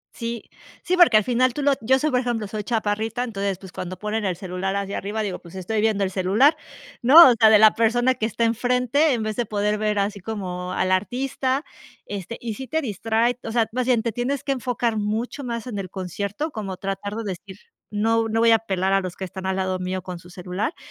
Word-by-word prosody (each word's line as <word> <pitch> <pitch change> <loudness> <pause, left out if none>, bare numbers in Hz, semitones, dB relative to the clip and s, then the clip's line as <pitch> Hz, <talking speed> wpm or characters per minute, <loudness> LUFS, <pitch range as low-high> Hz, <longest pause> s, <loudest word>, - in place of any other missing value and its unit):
Sí, 230 -1 -4 0.4
sí, 365 - +1
porque 350 -11 +6
al 215 - +3
final 250 +2 +1
tú 290 - -2
lo 285 0 +4
yo 260 +4 +3
soy, 305 +3 0
por 250 - +2
ejemplo, 240 -4 -2
soy 210 +1 -5
chaparrita, 220 +1 -1
entonces, 200 -5 -2
pues, 190 -1 -12
cuando 185 +1 -6
ponen 210 +3 -3
el 185 -2 0
celular 190 +1 -3
hacia 200 0 -3
arriba, 210 +3 -3
digo, 195 -3 -4
pues, 170 +1 -14
estoy 200 +4 -2
viendo 215 -2 +1
el 190 - -1
celular, 200 - +3 0.5
¿no? 275 +4 +9
O - - +4
sea, 220 - +7
de 215 - +7
la 215 0 +7
persona 240 +3 +2
que 220 -3 -2
está 230 +1 -2
enfrente, 250 +5 +2
en 230 -3 -1
vez 215 0 -3
de 240 - -1
poder 210 0 0
ver 210 -1 0
así 200 +1 -1
como 185 -3 -5
al 185 - 0
artista, 260 - -1 0.4
este, 205 +3 -6
y 230 -2 -4
sí 260 +5 -8
te 320 +6 -1
distrae. 230 - 0
O 225 - -5
sea, 230 -1 +2
más 250 +2 -2
bien, 240 -3 +2
te 230 - -1
tienes 245 +5 -2
que 275 - -1
enfocar 245 -3 -1
mucho 220 +6 -2
más 235 -3 -4
en 225 -5 -5
el 190 -2 -5
concierto, 200 - -4
como 200 -6 -5
tratar 195 +2 -4
de 225 - -4
decir: 190 +2 -9 0.3
"No 225 +2 +1
no 225 +1 0
voy 230 0 +5
a 225 - +5
pelar 190 -3 -1
a 195 - +3
los 185 -2 -6
que - - -7
están 190 +1 -6
al 190 - 0
lado 185 -1 -1
mío 185 0 -3
con 180 -2 -7
su 175 - -15
celular", 185 - -4
215 Hz, 235 wpm, -23 LUFS, 195-240 Hz, 0.5 s, no